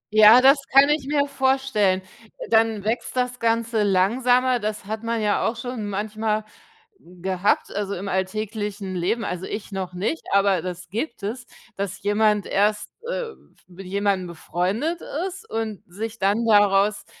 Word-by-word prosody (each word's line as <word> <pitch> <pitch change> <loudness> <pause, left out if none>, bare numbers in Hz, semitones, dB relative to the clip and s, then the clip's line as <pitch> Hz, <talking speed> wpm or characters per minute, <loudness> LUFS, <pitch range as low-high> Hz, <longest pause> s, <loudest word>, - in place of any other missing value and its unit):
Ja, 215 +3 +9
das 275 +2 +6
kann 275 +2 +7
ich 295 -3 0
mir 285 -1 +2
vorstellen. 265 -9 +1 0.5
Dann 225 -2 +3
wächst 225 +4 -2
das 250 0 -1
Ganze 230 -1 +1
langsamer. 245 +6 +3
Das 210 -1 -4
hat 220 +2 -4
man 230 0 -2
ja 210 - +1
auch 225 - -2
schon 230 -3 -5
manchmal 215 +1 -2 0.5
gehabt, 180 +2 -1
also 200 -1 -2
im 195 +3 -6
alltäglichen 205 +1 -3
Leben. 205 +6 -1
Also, 180 +1 -4
ich 215 0 -6
noch 190 -2 -4
nicht, 200 - -2
aber 195 -2 +3
das 180 0 -6
gibt 225 +1 -4
es, 240 +4 -5 0.3
dass 200 0 -4
jemand 210 0 +2
erst, 210 +1 0 0.2
äh, 480 -2 -3
f - - -16 0.3
mit 185 +1 -11
jemandem 200 -1 0
befreundet 185 - -2 0.3
ist 385 +4 -10
und 220 -3 -3
sich 220 +4 -6
dann 205 +4 +1
daraus 205 -1 +3
210 Hz, 155 wpm, -23 LUFS, 195-235 Hz, 0.5 s, Ja